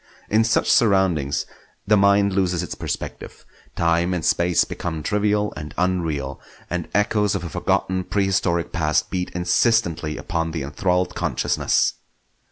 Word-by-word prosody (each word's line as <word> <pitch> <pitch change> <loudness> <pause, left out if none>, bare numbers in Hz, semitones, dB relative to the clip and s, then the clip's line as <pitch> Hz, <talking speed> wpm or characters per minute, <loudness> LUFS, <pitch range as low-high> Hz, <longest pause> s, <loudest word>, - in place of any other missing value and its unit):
In 110 +2 +4
such 115 +1 +1
surroundings 95 - +2 0.4
the 105 +2 +4
mind 100 0 +4
loses 90 -2 0
its - - -5
perspective; - - -6 0.3
time 85 +2 +1
and 85 - -3
space 85 0 +3
become 80 -3 -5
trivial 105 +1 0
and 75 0 -8
unreal, 80 -7 -1 0.3
and 90 -2 -2
echoes 105 0 +2
of 95 - -3
a 85 - -5
forgotten 95 +4 -1
prehistoric 90 -3 0
past 75 -3 0
beat 90 -1 -2
insistently 90 -4 +1
upon 80 -2 -3
the 80 -4 -3
enthralled 90 +6 0
consciousness. - - +1
90 Hz, 135 wpm, -22 LUFS, 80-100 Hz, 0.4 s, In